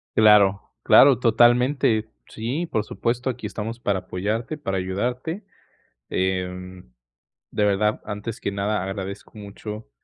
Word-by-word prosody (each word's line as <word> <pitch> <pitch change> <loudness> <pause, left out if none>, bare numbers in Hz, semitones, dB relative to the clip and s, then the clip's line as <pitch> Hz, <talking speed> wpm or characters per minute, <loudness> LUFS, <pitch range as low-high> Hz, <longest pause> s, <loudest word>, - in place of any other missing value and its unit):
Claro, 105 -3 +6 0.2
claro, 135 -3 +7
totalmente. 120 -1 +3 0.2
Sí, 135 +10 -3
por 110 - -1
supuesto, 120 +4 -2
aquí 125 - -6
estamos 115 +2 -5
para 100 -5 0
apoyarte, 105 - -3
para 95 -8 -2
ayudarte, 125 - -3 0.7
eh, 90 0 -2 0.7
de 105 - 0
verdad, 105 +1 +1
antes 105 +3 -5
que - - -2
nada, 100 0 -1
agradezco 95 +2 -6
mucho, 105 - -8
105 Hz, 120 wpm, -23 LUFS, 95-120 Hz, 0.7 s, claro